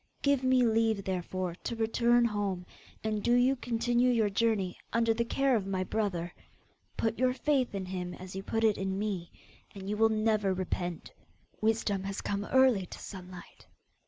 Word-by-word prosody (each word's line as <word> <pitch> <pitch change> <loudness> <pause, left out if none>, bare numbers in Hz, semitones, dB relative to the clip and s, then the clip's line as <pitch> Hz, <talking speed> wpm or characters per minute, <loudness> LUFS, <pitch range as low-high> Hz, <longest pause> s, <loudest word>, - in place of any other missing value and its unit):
Give 280 -2 +3
me 255 -1 +4
leave, 225 -2 +2
therefore, 185 -1 -3
to 235 - -3
return 235 +2 +3
home, 200 -5 -2 0.4
and 215 -1 -1
do 240 +4 +3
you 250 +2 +4
continue 240 0 +1
your 225 -4 +2
journey 200 -4 0
under 230 -1 +2
the 235 +1 0
care 270 +2 +1
of 200 -4 -1
my 190 -1 -1
brother. 180 -4 -2 0.6
Put 225 0 -1
your 255 0 +3
faith 260 -3 0
in 195 -1 -3
him 180 -1 -4
as 185 0 -9
you 190 - -3
put 225 +3 -2
it 215 -2 +3
in 190 0 -2
me, 195 -4 -3 0.4
and 195 -1 -8
you 210 +1 -2
will 225 +1 +5
never 215 -3 +1
repent. 180 -2 -3 0.5
Wisdom 215 -3 +1
has 195 0 -3
come 205 0 -2
early 255 -8 +4
to - - -9
Sunlight. 180 -3 -10
215 Hz, 175 wpm, -30 LUFS, 190-235 Hz, 0.6 s, will